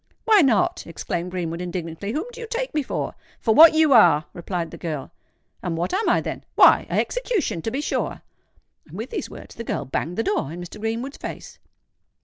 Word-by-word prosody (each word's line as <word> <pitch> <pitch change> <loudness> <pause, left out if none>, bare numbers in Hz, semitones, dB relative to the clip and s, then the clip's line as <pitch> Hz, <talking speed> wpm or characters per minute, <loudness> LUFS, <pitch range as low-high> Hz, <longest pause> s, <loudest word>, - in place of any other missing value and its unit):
"Why 435 -3 +6
not?" 240 - +2
exclaimed 170 +1 -4
Greenwood, 175 -2 -4
indignantly. 175 +2 -4
"Whom 310 - -2
do 475 - -9
you 465 - -6
take - - -3
me 300 - +1
for?" 270 - -3 0.3
"For 220 - +2
what 320 +6 +9
you 315 -3 +5
are," 155 -10 +6
replied 175 -2 -4
the - - -9
girl. 155 -5 -5 0.5
"And 170 -2 -3
what 175 - -2
am 420 +4 +1
I, - - +3
then?" - - -5
"Why—a - - +6
execution, 470 - -1
to 225 - -2
be 265 +5 -2
sure." - - -2 0.6
And, - - -11
with - - -6
these 460 - -4
words, - - -11
the 230 - -7
girl 145 - -3
banged 160 +6 -3
the 225 - +1
door 155 -9 -1
in 170 - -7
Mr. 175 +4 -9
Greenwood's 230 +6 -3
face. - - -8
215 Hz, 200 wpm, -23 LUFS, -, 0.6 s, what